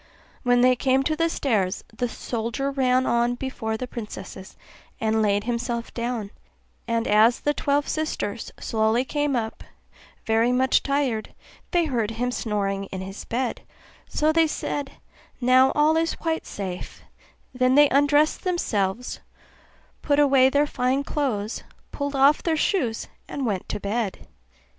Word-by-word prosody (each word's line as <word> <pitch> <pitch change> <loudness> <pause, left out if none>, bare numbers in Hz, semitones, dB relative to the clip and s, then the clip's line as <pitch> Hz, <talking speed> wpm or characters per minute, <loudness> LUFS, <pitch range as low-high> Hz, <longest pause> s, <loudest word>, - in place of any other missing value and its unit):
When 245 -1 +3
they 255 0 +5
came 265 +1 +2
to 310 +3 0
the 330 +1 +1
stairs, 210 - 0
the 245 +1 -1
soldier 235 +5 -3
ran 260 -1 +2
on 235 +1 +2
before 225 -4 -3
the 255 - -4
princesses, 210 -5 -8 0.4
and 220 0 +1
laid 205 -1 +2
himself 235 0 -3
down; 235 -4 -3 0.6
and 230 0 0
as 220 +3 +4
the 295 - +1
twelve 285 0 0
sisters 235 -9 -3
slowly 220 +3 +1
came 290 0 0
up 220 -2 -3 0.6
very 225 +2 +3
much 260 +1 +3
tired, 275 -6 -1 0.3
they 345 -1 +2
heard 235 -8 -1
him 240 +2 -2
snoring 200 -4 -2
in 190 -1 -6
his 195 +1 -7
bed; 245 +1 -2 0.5
so 305 +1 +2
they 325 0 +4
said, 285 -2 -3 0.5
'Now 255 +1 +5
all 300 +2 +4
is 330 0 +1
quite 325 -1 -3
safe'; 185 -3 -6 0.5
then 255 0 +2
they 295 0 +7
undressed 290 +2 +3
themselves, 240 - -1 0.8
put 285 -1 +1
away 270 -3 +5
their 285 +2 +3
fine 260 0 0
clothes, 235 -8 -2 0.3
pulled 285 0 -3
off 275 +2 +5
their 325 -2 0
shoes, 260 - 0 0.2
and 275 - -3
went 200 -5 -2
to - - -3
bed. 205 0 -3
250 Hz, 145 wpm, -24 LUFS, 220-285 Hz, 0.8 s, they